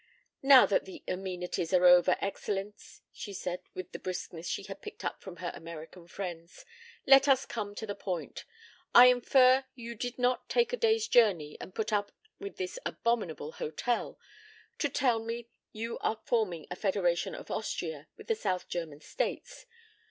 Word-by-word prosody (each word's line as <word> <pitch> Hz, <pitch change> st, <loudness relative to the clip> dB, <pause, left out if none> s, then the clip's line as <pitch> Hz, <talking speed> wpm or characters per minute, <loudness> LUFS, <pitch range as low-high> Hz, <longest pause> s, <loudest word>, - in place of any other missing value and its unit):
"Now 270 Hz, -1 st, +8 dB
that 200 Hz, -, +1 dB
the 190 Hz, -, -10 dB
amenities 180 Hz, -2 st, -3 dB
are 180 Hz, 0 st, +4 dB
over, 180 Hz, 0 st, +7 dB
Excellenz," 200 Hz, +1 st, -5 dB
she 200 Hz, -, -7 dB
said 180 Hz, -1 st, -4 dB, 0.2 s
with 185 Hz, -1 st, -6 dB
the -, -, -7 dB
briskness 175 Hz, -2 st, -5 dB
she -, -, -2 dB
had 195 Hz, 0 st, -9 dB
picked -, -, -9 dB
up -, -, -3 dB
from 190 Hz, -3 st, -9 dB
her 175 Hz, 0 st, -4 dB
American 165 Hz, +1 st, -10 dB
friends, 175 Hz, -, -7 dB, 0.4 s
"let 270 Hz, +1 st, +7 dB
us 270 Hz, -1 st, +4 dB
come 205 Hz, -3 st, -5 dB
to 220 Hz, -, -5 dB
the 205 Hz, -, -4 dB
point. 180 Hz, -5 st, -5 dB, 0.5 s
I 250 Hz, +1 st, +11 dB
infer 255 Hz, +1 st, +5 dB
you 235 Hz, -1 st, -7 dB
did 245 Hz, +2 st, -5 dB
not 250 Hz, 0 st, 0 dB
take 475 Hz, 0 st, +2 dB
a -, -, +3 dB
day's 450 Hz, -1 st, +2 dB
journey 185 Hz, -11 st, +3 dB
and 185 Hz, -, -9 dB
put 220 Hz, 0 st, -2 dB
up 205 Hz, -1 st, 0 dB, 0.3 s
with 400 Hz, 0 st, -7 dB
this 380 Hz, +5 st, -4 dB
abominable 195 Hz, -10 st, -2 dB
hotel 235 Hz, +13 st, -2 dB, 0.6 s
to 290 Hz, -, +1 dB
tell 250 Hz, -4 st, +2 dB
me 230 Hz, +1 st, -4 dB
that 235 Hz, -, -38 dB, 0.2 s
you 230 Hz, +2 st, -5 dB
are 220 Hz, -, -1 dB
forming 185 Hz, -10 st, 0 dB
a -, -, -2 dB
Federation 180 Hz, -4 st, 0 dB
of -, -, -9 dB
Austria 160 Hz, -8 st, -4 dB
and -, -, -12 dB
the 455 Hz, -, +2 dB
South 185 Hz, -, -2 dB
German 155 Hz, -4 st, -5 dB
States. -, -, -4 dB
200 Hz, 175 wpm, -30 LUFS, 180-245 Hz, 0.6 s, I